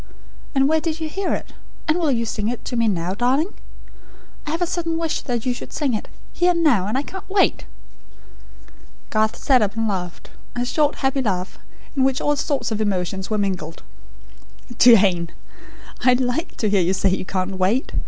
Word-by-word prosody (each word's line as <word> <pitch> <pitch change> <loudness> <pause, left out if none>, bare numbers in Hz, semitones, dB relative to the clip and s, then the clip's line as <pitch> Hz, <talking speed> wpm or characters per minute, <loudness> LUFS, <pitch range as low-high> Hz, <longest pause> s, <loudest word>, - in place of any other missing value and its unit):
And 270 0 +4
where 315 +1 +2
did 325 0 -2
you 320 - -2
hear 390 +5 -2
it? - - -8 0.3
And 310 +3 +2
will 325 -3 +1
you 230 -3 +1
sing 210 -1 -2
it 240 +1 -4
to 245 - -3
me 230 -1 +2
now, 180 -3 0
darling? 265 - +1 0.9
I - - -2
have 325 +3 -2
a - - +2
sudden 330 -1 -2
wish 330 -1 -1
that 240 -3 -3
you 250 - +1
should - - -8
sing 285 -5 -1
it, 215 - -3 0.3
here 350 +1 +2
and 340 -1 0
now; 230 - +3
and 215 - -1
I 275 - 0
can't 380 +4 -9
wait!" 390 0 +2 1.5
Garth 215 0 +2
sat 260 -3 +3
up, 205 0 0
and 225 0 0
laughed 180 -4 -4 0.2
a 245 0 -1
short 295 +3 +1
happy 270 0 0
laugh, 185 -6 -2 0.4
in 270 - +2
which 265 +1 +2
all 295 -1 +1
sorts 275 -5 -1
of 220 0 -1
emotions 190 -2 -1
were 215 - 0
mingled. 185 -6 -3 1.0
"Jane! 190 -8 +6 0.7
I 250 0 +6
like 250 +6 -1
to 215 - 0
hear 200 -2 +4
you 180 +2 +2
say 195 0 +2
you 190 - -1
can't 185 0 -3
wait. 205 +8 +1
245 Hz, 195 wpm, -22 LUFS, 200-295 Hz, 1.5 s, Jane